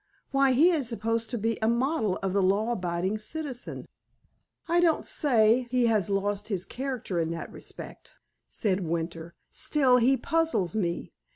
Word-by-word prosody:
"Why, 275 Hz, -1 st, +3 dB
he 320 Hz, +8 st, +5 dB
is 290 Hz, -8 st, 0 dB
supposed 230 Hz, 0 st, -2 dB
to 245 Hz, -, -3 dB
be 225 Hz, +1 st, -1 dB
a 220 Hz, -, +2 dB
model 235 Hz, -, +1 dB
of 190 Hz, -1 st, -1 dB
the 200 Hz, -, +2 dB
law 200 Hz, +5 st, +2 dB
abiding 185 Hz, 0 st, -2 dB
citizen." 265 Hz, +2 st, -6 dB, 0.8 s
"I 340 Hz, +1 st, +3 dB
don't 335 Hz, -3 st, +2 dB
say 240 Hz, -3 st, +3 dB
he 250 Hz, -1 st, +2 dB
has 215 Hz, -5 st, +1 dB
lost 200 Hz, 0 st, -1 dB
his 195 Hz, -4 st, -2 dB
character 255 Hz, -9 st, -4 dB
in 165 Hz, -1 st, 0 dB
that 165 Hz, -, -6 dB
respect," -, -, -10 dB, 0.3 s
said 195 Hz, -3 st, 0 dB
Winter. 165 Hz, -1 st, -4 dB, 0.2 s
"Still, 265 Hz, -4 st, +3 dB
he 255 Hz, +3 st, +4 dB
puzzles 320 Hz, -, 0 dB
me. 175 Hz, -5 st, -2 dB
225 Hz, 160 wpm, -27 LUFS, 195-260 Hz, 0.8 s, he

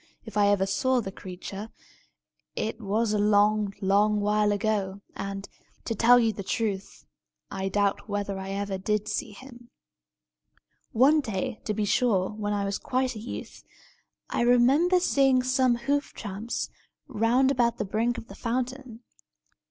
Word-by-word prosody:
If 220 Hz, -3 st, -10 dB
I 205 Hz, -1 st, +4 dB
ever 200 Hz, -1 st, +3 dB
saw 255 Hz, +6 st, +1 dB
the 195 Hz, -5 st, -4 dB
creature, 195 Hz, +3 st, -8 dB, 0.9 s
it 225 Hz, +2 st, -3 dB
was 215 Hz, +2 st, 0 dB
a 210 Hz, -, +1 dB
long, 210 Hz, 0 st, +3 dB
long 205 Hz, +2 st, +3 dB
while 210 Hz, 0 st, +2 dB
ago; 200 Hz, -2 st, -1 dB
and, 195 Hz, 0 st, -5 dB, 0.4 s
to 230 Hz, -, -1 dB
tell 240 Hz, +3 st, +6 dB
you 225 Hz, -2 st, +2 dB
the 200 Hz, -, -6 dB
truth, 200 Hz, -1 st, -3 dB, 0.5 s
I 195 Hz, 0 st, -2 dB
doubt 205 Hz, +1 st, 0 dB
whether 200 Hz, -1 st, -2 dB
I 190 Hz, 0 st, -6 dB
ever 195 Hz, -1 st, -3 dB
did 210 Hz, +2 st, -1 dB
see -, -, -2 dB
him. 240 Hz, +2 st, -13 dB, 1.2 s
One 275 Hz, +7 st, +5 dB
day, 230 Hz, 0 st, -4 dB
to 210 Hz, -, -1 dB
be 210 Hz, -, 0 dB
sure, 200 Hz, -4 st, +2 dB
when 210 Hz, -1 st, -3 dB
I 200 Hz, -1 st, 0 dB
was 200 Hz, 0 st, -2 dB
quite 255 Hz, -1 st, -1 dB
a -, -, -6 dB
youth, 225 Hz, -, -8 dB, 0.6 s
I -, -, -1 dB
remember 265 Hz, +10 st, +4 dB
seeing 270 Hz, -7 st, +3 dB
some 255 Hz, -1 st, +2 dB
hoof 280 Hz, +4 st, -1 dB
tramps 210 Hz, +2 st, -5 dB, 0.4 s
round 250 Hz, +2 st, +2 dB
about 240 Hz, -3 st, +1 dB
the -, -, -2 dB
brink 230 Hz, +5 st, 0 dB
of -, -, -8 dB
the -, -, -11 dB
fountain. 255 Hz, 0 st, -4 dB
215 Hz, 155 wpm, -27 LUFS, 200-245 Hz, 1.2 s, tell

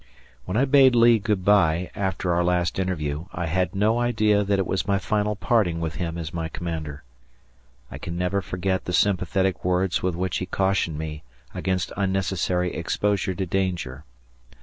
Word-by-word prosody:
When 95 Hz, -, -2 dB
I 130 Hz, -, +4 dB
bade 135 Hz, -2 st, +5 dB
Lee 115 Hz, -1 st, +6 dB
good 100 Hz, -3 st, -1 dB
by 90 Hz, -4 st, +3 dB
after 95 Hz, -2 st, -1 dB
our 85 Hz, +1 st, +2 dB
last 90 Hz, 0 st, 0 dB
interview, 80 Hz, -4 st, -2 dB
I 85 Hz, -, -3 dB
had 90 Hz, +4 st, -1 dB
no 110 Hz, +4 st, +2 dB
idea 110 Hz, -4 st, +2 dB
that 100 Hz, 0 st, +1 dB
it 95 Hz, -, 0 dB
was 95 Hz, +3 st, -2 dB
my 100 Hz, -1 st, +2 dB
final 105 Hz, +1 st, 0 dB
parting 100 Hz, -6 st, +1 dB
with 80 Hz, -3 st, -3 dB
him 85 Hz, -2 st, -3 dB
as 80 Hz, -2 st, -5 dB
my 80 Hz, -1 st, -3 dB
commander. 80 Hz, -5 st, -5 dB, 0.9 s
I -, -, -7 dB
can 85 Hz, +1 st, -5 dB
never 90 Hz, +3 st, 0 dB
forget 95 Hz, 0 st, -2 dB
the 90 Hz, -, -3 dB
sympathetic 95 Hz, 0 st, +1 dB
words 90 Hz, 0 st, +1 dB
with 90 Hz, -2 st, -1 dB
which 90 Hz, +2 st, -1 dB
he 95 Hz, -, -4 dB
cautioned 95 Hz, -5 st, 0 dB
me 75 Hz, -1 st, -5 dB, 0.3 s
against 95 Hz, -2 st, -2 dB
unnecessary 95 Hz, -2 st, 0 dB
exposure 100 Hz, -2 st, -1 dB
to 95 Hz, -, -2 dB
danger. 85 Hz, -7 st, -2 dB
95 Hz, 170 wpm, -24 LUFS, 85-100 Hz, 0.9 s, Lee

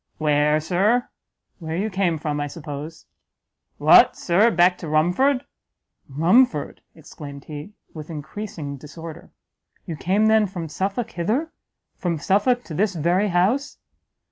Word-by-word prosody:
"Where, 150 Hz, 0 st, +2 dB
Sir?" 195 Hz, +10 st, +1 dB, 0.5 s
"Where 160 Hz, -1 st, -4 dB
you 210 Hz, +4 st, -2 dB
came 185 Hz, -4 st, 0 dB
from, 150 Hz, -1 st, -3 dB
I 145 Hz, -, -2 dB
suppose." 150 Hz, +1 st, -8 dB, 0.7 s
"What, -, -, +6 dB
Sir, 195 Hz, +7 st, +3 dB
back 180 Hz, -3 st, +3 dB
to 165 Hz, -, -7 dB
Rumford?" 180 Hz, -, +2 dB, 0.6 s
"Rumford!" 165 Hz, -, +2 dB
exclaimed 145 Hz, -3 st, -10 dB
he, 150 Hz, +7 st, -8 dB, 0.2 s
with 155 Hz, 0 st, -9 dB
encreasing 155 Hz, -2 st, -6 dB
disorder, 160 Hz, +4 st, -10 dB, 0.6 s
"you 165 Hz, -, -5 dB
came 195 Hz, +8 st, +1 dB
then 220 Hz, -1 st, +4 dB
from 175 Hz, -4 st, -6 dB
Suffolk 200 Hz, +8 st, -3 dB
hither? 225 Hz, -, -1 dB, 0.5 s
from 175 Hz, -3 st, -1 dB
Suffolk 210 Hz, -, +1 dB
to 160 Hz, -, -9 dB
this 195 Hz, +3 st, 0 dB
very 175 Hz, +6 st, +1 dB
house?" 205 Hz, +10 st, 0 dB
175 Hz, 130 wpm, -22 LUFS, 155-205 Hz, 0.7 s, What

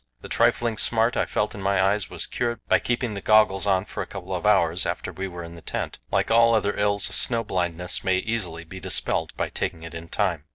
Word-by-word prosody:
The -, -, -10 dB
trifling 115 Hz, -2 st, +1 dB
smart 115 Hz, +1 st, +3 dB
I -, -, 0 dB
felt 105 Hz, -, -1 dB
in 100 Hz, -, -8 dB
my 100 Hz, 0 st, +1 dB
eyes 100 Hz, +1 st, +1 dB
was -, -, -2 dB
cured 120 Hz, -1 st, -2 dB
by -, -, +4 dB
keeping 120 Hz, -2 st, -2 dB
the 100 Hz, -, -5 dB
goggles 105 Hz, -2 st, +4 dB
on 95 Hz, -1 st, +2 dB
for -, -, -6 dB
a -, -, -5 dB
couple 95 Hz, -1 st, -7 dB
of 90 Hz, +2 st, -1 dB
hours 90 Hz, -4 st, +3 dB
after -, -, -3 dB
we 95 Hz, +1 st, -4 dB
were 90 Hz, -2 st, -8 dB
in 85 Hz, 0 st, -9 dB
the 85 Hz, -, -12 dB
tent. -, -, -4 dB
Like -, -, 0 dB
all 115 Hz, 0 st, +5 dB
other 105 Hz, -2 st, 0 dB
ills, 100 Hz, -1 st, +1 dB
snow 115 Hz, -2 st, +2 dB
blindness 90 Hz, -3 st, -2 dB
may 95 Hz, -1 st, +2 dB
easily 95 Hz, -6 st, -2 dB
be 95 Hz, +3 st, -10 dB
dispelled 80 Hz, -3 st, 0 dB
by -, -, -1 dB
taking 80 Hz, -, -3 dB
it 85 Hz, -, -9 dB
in 85 Hz, 0 st, -8 dB
time. 85 Hz, -2 st, -1 dB
95 Hz, 235 wpm, -24 LUFS, 90-110 Hz, -, all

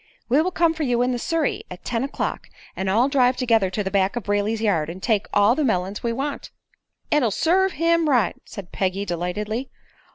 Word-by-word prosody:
"We 275 Hz, +6 st, +4 dB
will 355 Hz, -, 0 dB
come 335 Hz, -2 st, +2 dB
for 320 Hz, -, -7 dB
you 245 Hz, -4 st, +1 dB
in 250 Hz, -, +1 dB
the 245 Hz, -, -2 dB
surrey 325 Hz, +3 st, -1 dB
at 180 Hz, 0 st, -10 dB
ten 235 Hz, 0 st, -1 dB
o'clock, 275 Hz, -, -3 dB, 0.3 s
and 190 Hz, 0 st, -2 dB
all 230 Hz, +7 st, +3 dB
drive 255 Hz, -3 st, +3 dB
together 225 Hz, -6 st, +2 dB
to 205 Hz, +3 st, -2 dB
the 190 Hz, -, -3 dB
back 195 Hz, +1 st, +1 dB
of 240 Hz, -, -3 dB
Brayley's 205 Hz, +2 st, 0 dB
yard 175 Hz, -8 st, +1 dB
and 170 Hz, -, -6 dB
take 210 Hz, 0 st, 0 dB
all 205 Hz, +3 st, +4 dB
the 300 Hz, +4 st, 0 dB
melons 195 Hz, -5 st, -1 dB
we 235 Hz, -, -1 dB
want." 275 Hz, +5 st, -4 dB, 0.6 s
"It'll 295 Hz, -6 st, +3 dB
serve 365 Hz, -, +2 dB
him 335 Hz, 0 st, +2 dB
right," 245 Hz, -6 st, +2 dB
said 195 Hz, -4 st, -10 dB
Peggy, 195 Hz, +1 st, -1 dB
delightedly. 205 Hz, +8 st, -3 dB
230 Hz, 205 wpm, -23 LUFS, 200-275 Hz, 0.6 s, We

